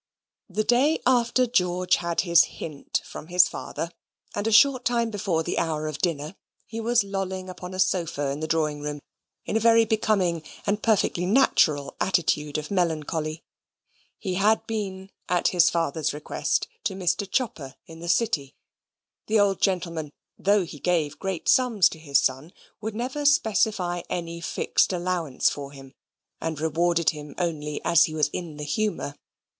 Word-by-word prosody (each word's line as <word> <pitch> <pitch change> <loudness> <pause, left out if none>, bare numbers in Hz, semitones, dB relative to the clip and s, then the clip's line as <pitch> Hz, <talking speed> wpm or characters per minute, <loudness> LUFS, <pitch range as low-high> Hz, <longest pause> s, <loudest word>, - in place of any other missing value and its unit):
The 210 +3 -1
day 265 +8 +3
after 250 0 +3
George 180 -6 +1
had 170 -1 -1
his 170 -2 +5
hint 150 -3 -5
from 155 - -9
his 180 +1 +5
father, 170 - -5 0.4
and 205 +1 -2
a - - +1
short 255 +3 +5
time 235 -2 +1
before 185 -6 -1
the - - -1
hour 155 -2 -1
of 155 -1 -4
dinner, 155 -2 -2 0.3
he 225 +1 -6
was 235 0 +2
lolling 190 -1 -4
upon 180 0 -8
a - - -6
sofa 170 -6 0
in 140 - -4
the 155 - -3
drawing 155 -2 0
room 150 0 -5 0.4
in - - -3
a - - +4
very 230 0 +5
becoming 205 -6 +1 0.2
and 210 +1 0
perfectly 195 -5 +1
natural 160 - +3
attitude 155 -5 +1
of 155 +3 -6
melancholy. 160 -3 -1 0.7
He 190 -3 -3
had 210 +4 +2
been, 195 -3 -4 0.2
at 180 -1 +2
his 175 -2 +4
father's 160 -3 -1
request, 150 - -1 0.2
to 200 -4 -1
Mr. 190 +1 -1
Chopper 170 - -2
in 165 0 -12
the 170 +1 -6
City 160 - 0 0.7
(the 220 0 +3
old 200 -1 +2
gentleman, 170 -6 -1 0.2
though 200 -1 +2
he 155 -3 -10
gave 155 -4 0
great 190 -3 -4
sums 230 -8 +4
to 160 - -10
his 140 -3 +2
son, 135 +6 -1 0.3
would 220 0 -4
never 255 +6 -3
specify 215 - +2
any 170 -1 -4
fixed 170 - +1
allowance 175 -6 0
for 140 -1 -7
him, 135 -1 -13 0.5
and 160 -2 -3
rewarded 165 0 +2
him 150 -2 -10
only 150 -4 -2
as 170 - +5
he 155 - -6
was 150 -2 +2
in 165 -2 -6
the 150 - -5
humour). 175 -3 -2
175 Hz, 165 wpm, -25 LUFS, 155-210 Hz, 0.7 s, his